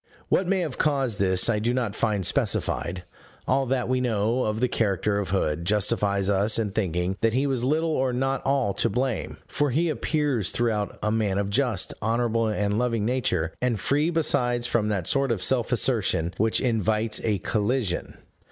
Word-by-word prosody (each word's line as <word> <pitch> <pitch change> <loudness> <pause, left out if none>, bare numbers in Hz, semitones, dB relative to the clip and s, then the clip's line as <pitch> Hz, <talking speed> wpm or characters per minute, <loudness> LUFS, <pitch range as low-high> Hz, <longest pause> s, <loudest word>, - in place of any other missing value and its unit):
What 185 - +2
may 190 0 +1
have 155 -7 -4
caused 135 -7 0
this 95 -1 +2
I 110 -3 +1
do 120 +3 0
not 120 -5 -1
find 105 -3 0
specified: 90 +2 -1 0.4
all 135 +1 +1
that 130 -1 0
we 130 0 0
know 115 +1 0
of 110 0 -1
the 125 - +2
character 100 -2 0
of 100 - -3
Hood 85 -4 -1
justifies 100 0 +1
us 100 +2 +2
in 110 -3 -1
thinking 95 -2 -1
that 115 0 +2
he 135 +2 +1
was 130 -4 -1
little 160 +5 +1
or 130 -4 0
not 135 +2 -1
at - - -22
all 135 -7 +1
to - - +1
blame, 125 +2 -2
for 145 0 0
he 160 +6 +1
appears 145 - 0
throughout 110 -4 0
a 105 - +1
man 105 -3 0
of 100 0 -1
just, 120 -5 +1
honorable, 115 0 0
and 105 0 0
loving 115 -4 0
nature, 110 -10 0
and 125 -4 0
free 145 - +1
besides 125 -7 +1
from 120 -3 +1
that 100 -5 -1
sort 135 +4 +1
of 100 -6 0
self 125 +3 +1
assertion 105 -9 +1
which 110 +1 +2
invites 110 -2 +1
a 105 -3 +1
collision. 105 0 -2
115 Hz, 190 wpm, -25 LUFS, 100-130 Hz, 0.4 s, What